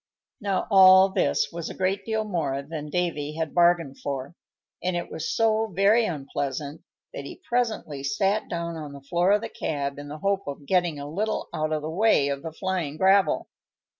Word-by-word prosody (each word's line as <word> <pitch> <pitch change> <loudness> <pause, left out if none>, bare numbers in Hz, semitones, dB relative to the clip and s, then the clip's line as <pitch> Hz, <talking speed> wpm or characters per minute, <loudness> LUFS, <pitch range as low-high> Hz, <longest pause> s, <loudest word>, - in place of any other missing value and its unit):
Now, 200 -3 -1
all 190 0 +8
this 190 - +1
was 170 -1 -5
a - - -8
great 190 +2 -1
deal 220 -1 0
more 150 -9 -2
than 150 0 -6
Davy 150 -3 -1
had 160 -1 -3
bargained 170 -5 +3
for, 140 +1 -4 0.5
and 180 0 -1
it 175 - -4
was 160 - -3
so 225 -1 +2
very 205 +4 +3
unpleasant 145 -2 -4 0.3
that - - -6
he - - -9
presently 220 - -1
sat 195 +10 0
down 170 -1 -3
on 150 -2 -7
the 140 - -10
floor 175 +6 +1
of 205 0 +3
the - - -4
cab 140 -2 -3
in 145 - -8
the 150 +1 -7
hope 200 +4 -1
of 140 0 -6
getting 175 -2 +1
a 140 - -6
little 210 +8 -2
out 155 0 -1
of 155 -1 -1
the 155 - -3
way 180 -6 +3
of 140 -1 -3
the 165 - -6
flying 170 -4 -3
gravel. 190 +2 +3
170 Hz, 195 wpm, -25 LUFS, 145-195 Hz, 0.5 s, all